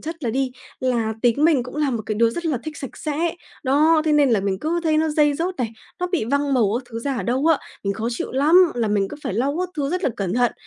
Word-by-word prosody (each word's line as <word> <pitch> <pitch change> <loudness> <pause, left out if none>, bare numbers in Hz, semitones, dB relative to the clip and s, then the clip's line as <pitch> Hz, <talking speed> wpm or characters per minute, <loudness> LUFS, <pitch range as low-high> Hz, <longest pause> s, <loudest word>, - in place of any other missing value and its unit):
chất 325 +1 -7
là 230 - 0
đi 265 +2 0 0.3
là 235 -4 0
tính 245 +5 +3
mình 310 -6 +4
cũng 250 +4 -9
là 295 -2 +1
một 230 -3 -2
cái 215 - -1
đứa 230 +2 +3
rất 345 +7 -5
là 290 -6 0
thích 310 -1 -6
sạch 270 - -8
sẽ, 320 +3 -2 0.3
đó, 310 +4 +4
thế 310 - +2
nên 290 -3 +4
là 215 -4 +3
mình 195 -1 -1
cứ 335 - -1
thấy 315 -2 +2
nó 320 0 +2
dây 295 -1 +3
rớt 355 +4 -2
này, 240 -4 -1 0.3
nó 360 - +1
bị 355 - -1
văng 280 +3 0
màu 220 -6 +3
các - - -9
thứ 230 - -5
ra 270 +3 -2
ở - - -2
đâu 260 +6 0
á, 325 -3 +4 0.3
mình 200 - +1
khó 220 +3 -3
chịu 235 - -4
lắm, 320 +7 +5
là 230 -3 0
mình 200 -2 +1
cứ - - -8
phải 190 - -3
lau 275 +7 0
các 365 - -1
thứ 285 -1 -1
rất 365 +1 -2
là - - +2
cẩn 195 0 -2
thận, 245 -1 +2
275 Hz, 290 wpm, -22 LUFS, 235-310 Hz, 0.3 s, lắm